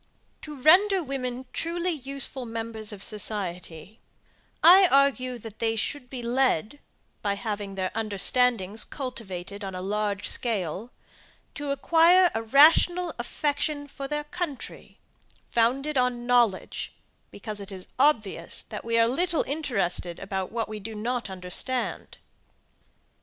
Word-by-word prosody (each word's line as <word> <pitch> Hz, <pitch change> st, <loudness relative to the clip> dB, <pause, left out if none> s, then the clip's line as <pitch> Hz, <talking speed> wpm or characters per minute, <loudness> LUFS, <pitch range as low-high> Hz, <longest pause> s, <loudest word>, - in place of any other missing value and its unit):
To 300 Hz, -3 st, -8 dB
render 370 Hz, +6 st, +5 dB
women 260 Hz, -2 st, -4 dB
truly 345 Hz, +2 st, 0 dB
useful 275 Hz, -3 st, -5 dB
members 225 Hz, -1 st, -5 dB
of 200 Hz, -2 st, -6 dB
society, 190 Hz, -2 st, -3 dB, 0.6 s
I 370 Hz, +3 st, +9 dB
argue, 265 Hz, -2 st, +2 dB
that 225 Hz, -2 st, -11 dB
they 225 Hz, -1 st, 0 dB
should 250 Hz, +4 st, -3 dB
be 250 Hz, -2 st, -6 dB
led, 250 Hz, -, +1 dB, 0.4 s
by 200 Hz, -1 st, 0 dB
having 205 Hz, -1 st, -4 dB
their 185 Hz, -1 st, -2 dB
understandings 220 Hz, 0 st, +1 dB
cultivated 200 Hz, -7 st, -6 dB
on 190 Hz, -1 st, -5 dB
a 180 Hz, -, -5 dB
large 205 Hz, 0 st, -1 dB
scale, 205 Hz, -2 st, -2 dB, 0.6 s
to 290 Hz, -1 st, -5 dB
acquire 335 Hz, +6 st, +5 dB
a 225 Hz, -, -1 dB
rational 320 Hz, +8 st, +5 dB
affection 290 Hz, +3 st, -2 dB
for 275 Hz, -1 st, -7 dB
their 295 Hz, +1 st, -2 dB
country, 295 Hz, -2 st, -6 dB, 0.5 s
founded 265 Hz, +5 st, +1 dB
on 245 Hz, -1 st, 0 dB
knowledge, 240 Hz, -5 st, +1 dB, 0.3 s
because 210 Hz, 0 st, -6 dB
it 200 Hz, 0 st, -7 dB
is 185 Hz, -1 st, -7 dB
obvious, 215 Hz, -, +1 dB
that -, -, -8 dB
we 230 Hz, 0 st, 0 dB
are 230 Hz, 0 st, +5 dB
little 335 Hz, +7 st, +1 dB
interested 200 Hz, -, -2 dB
about 190 Hz, -1 st, -4 dB
what 230 Hz, -1 st, -2 dB
we 215 Hz, 0 st, -6 dB
do 220 Hz, +2 st, -7 dB
not 235 Hz, +1 st, -3 dB
understand. 190 Hz, +7 st, -2 dB
240 Hz, 130 wpm, -26 LUFS, 205-280 Hz, 0.6 s, I